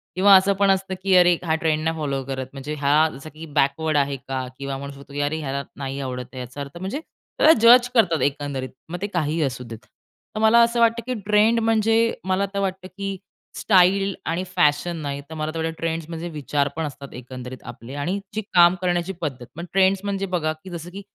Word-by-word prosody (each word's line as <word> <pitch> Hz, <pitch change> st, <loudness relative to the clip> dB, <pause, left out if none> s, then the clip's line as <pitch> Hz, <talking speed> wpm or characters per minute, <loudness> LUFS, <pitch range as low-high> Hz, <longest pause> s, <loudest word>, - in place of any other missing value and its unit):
किंवा 195 Hz, +1 st, +7 dB
असं 195 Hz, +1 st, +5 dB
पण 200 Hz, -1 st, +4 dB
असतं 190 Hz, 0 st, -1 dB
की 190 Hz, -1 st, +3 dB
"अरे, 175 Hz, -1 st, +6 dB
हा 160 Hz, -1 st, +2 dB
ट्रेंड 155 Hz, -1 st, 0 dB
नाही 160 Hz, 0 st, -1 dB
फॉलो 140 Hz, -3 st, -2 dB
करत, 130 Hz, -1 st, -4 dB
म्हणजे 140 Hz, +2 st, -6 dB
हा, 150 Hz, +2 st, +3 dB
जसं 140 Hz, +3 st, -10 dB
की 160 Hz, +1 st, -9 dB
बॅकवर्ड 150 Hz, +1 st, +1 dB
आहे 140 Hz, 0 st, +1 dB
का?" 130 Hz, -1 st, -5 dB
किंवा 140 Hz, -1 st, -4 dB
म्हणू 140 Hz, 0 st, -7 dB
शकतो 140 Hz, 0 st, -14 dB
की 145 Hz, -, -4 dB
"अरे, 145 Hz, +2 st, -1 dB
ह्याला 140 Hz, -1 st, -3 dB
नाही 135 Hz, 0 st, -4 dB
आवडत 125 Hz, -2 st, -4 dB
आहे. 130 Hz, -, -7 dB
याचा 125 Hz, +3 st, -7 dB
अर्थ" 140 Hz, +4 st, -8 dB
म्हणजे 195 Hz, +10 st, -4 dB
त्याला 320 Hz, 0 st, +2 dB
जज 245 Hz, +1 st, +8 dB
करतात 185 Hz, -9 st, +3 dB
एकंदरीत. 140 Hz, -2 st, -2 dB, 0.2 s
मग 175 Hz, +1 st, -6 dB
ते 205 Hz, -, -1 dB
काहीही 160 Hz, -4 st, -1 dB
असू 130 Hz, -2 st, -3 dB
देत. 115 Hz, -2 st, -8 dB, 0.6 s
तर 215 Hz, -, -2 dB
मला 220 Hz, +2 st, +5 dB
असं 235 Hz, +1 st, +1 dB
वाटतं 230 Hz, 0 st, +3 dB
की 255 Hz, -, -1 dB
ट्रेंड 215 Hz, +2 st, +4 dB
म्हणजे 225 Hz, +1 st, +2 dB
मला 190 Hz, +1 st, +1 dB
तर 200 Hz, -, -1 dB
वाटतं 190 Hz, -1 st, -3 dB
की 195 Hz, -1 st, -3 dB, 0.4 s
स्टाईल 195 Hz, 0 st, +3 dB
आणि 170 Hz, +3 st, -1 dB
फॅशन 160 Hz, +1 st, +2 dB
नाही, 140 Hz, -1 st, -4 dB
तर -, -, -8 dB
मला 155 Hz, 0 st, -3 dB
ते 165 Hz, 0 st, -1 dB
ट्रेंड्स 165 Hz, -1 st, -3 dB
म्हणजे 165 Hz, +1 st, -5 dB
विचार 145 Hz, -2 st, -1 dB
पण 160 Hz, 0 st, -2 dB
असतात 140 Hz, -1 st, -8 dB
एकंदरीत 125 Hz, 0 st, -9 dB
आपले. 120 Hz, +3 st, -10 dB
आणि 175 Hz, +8 st, -2 dB, 0.2 s
जी 215 Hz, -, 0 dB
काम 175 Hz, 0 st, +6 dB
करण्याची 175 Hz, +1 st, 0 dB
पद्धत. 130 Hz, -6 st, -4 dB
पण 170 Hz, +2 st, -6 dB
ट्रेंड्स 190 Hz, 0 st, +4 dB
म्हणजे 200 Hz, -1 st, -2 dB
बघा 175 Hz, -4 st, -1 dB
की 190 Hz, -, -9 dB
जसं 170 Hz, -1 st, -7 dB
की 195 Hz, +2 st, -8 dB
160 Hz, 215 wpm, -23 LUFS, 140-195 Hz, 0.6 s, जज